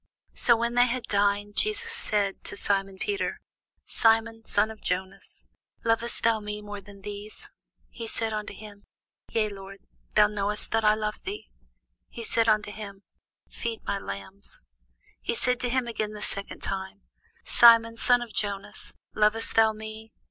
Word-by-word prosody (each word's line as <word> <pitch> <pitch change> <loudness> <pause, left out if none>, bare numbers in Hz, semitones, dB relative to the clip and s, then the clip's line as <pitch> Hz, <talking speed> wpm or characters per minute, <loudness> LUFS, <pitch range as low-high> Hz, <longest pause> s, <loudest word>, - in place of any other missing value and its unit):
So 235 -2 +4
when 235 +1 -1
they 245 +1 +5
had 250 0 -2
dined, 205 0 0
Jesus 430 +2 +1
saith 210 - 0
to - - -3
Simon 195 -1 0
Peter, 400 - -2 0.5
Simon, 225 0 +2
son 215 +2 +2
of 220 - -12
Jonas, 190 +2 -4 0.4
lovest 230 +1 +4
thou 230 -1 +3
me 210 0 -5
more 205 -1 -7
than 200 0 -14
these? 205 +1 -6 0.4
He 230 -2 -6
saith 225 0 -2
unto 210 -1 -4
him, 205 0 -12 0.4
Yea, 215 -2 +1
Lord; 195 -1 -9 0.4
thou 210 - +7
knowest 210 0 -1
that 225 0 +2
I 210 0 +5
love 215 0 -3
thee. - - -7 0.6
He 235 - -7
saith 230 0 +2
unto 210 -1 +2
him, 200 -2 -9 0.4
Feed 230 -1 -5
my 200 - -2
lambs. 145 - -8 0.6
He 235 - -1
saith 250 +1 +1
to 245 - -1
him 255 0 +1
again 215 -2 -3
the 210 0 -6
second 200 0 -4
time, 195 +1 -4 0.4
Simon, 230 -1 +7
son 245 +1 +3
of 230 -3 -11
Jonas, 200 -1 -4 0.2
lovest 215 +1 +4
thou 220 -1 +5
me? 220 +1 -9
215 Hz, 160 wpm, -27 LUFS, 200-230 Hz, 0.6 s, thou